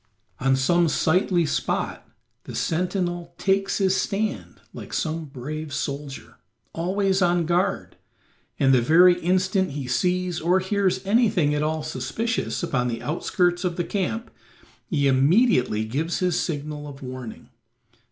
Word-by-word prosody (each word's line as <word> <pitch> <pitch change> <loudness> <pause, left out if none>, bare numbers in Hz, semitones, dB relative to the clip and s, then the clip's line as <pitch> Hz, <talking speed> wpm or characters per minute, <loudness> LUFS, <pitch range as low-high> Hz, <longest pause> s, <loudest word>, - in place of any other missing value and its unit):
On 135 +1 +2
some 170 +6 +2
sightly 175 +2 +2
spot - - -2 0.4
the - - -7
sentinel 175 0 -2
takes 195 0 +1
his 190 -1 +2
stand 205 +2 -2
like - - -9
some 160 0 -2
brave 150 +3 -6
soldier, 140 - -5 0.4
always 190 +3 0
on 175 -1 +2
guard, 180 +4 -1 0.6
and 135 -1 +4
the 125 - +5
very 175 +7 +5
instant 185 -1 +1
he 140 -2 -4
sees 180 +7 0
or 175 +3 +3
hears 190 0 0
anything 200 -8 +3
at 150 - 0
all 155 0 -1
suspicious 155 - -3
upon 130 -7 0
the 115 -1 -4
outskirts 175 +3 0
of 180 -2 -1
the 175 - -1
camp 205 +6 -3 0.6
he 150 -8 0
immediately 135 - +3
gives 150 +9 -2
his 180 -2 +1
signal 150 -2 -4
of 140 -1 -10
warning. 125 -3 -8
170 Hz, 135 wpm, -24 LUFS, 145-185 Hz, 0.6 s, the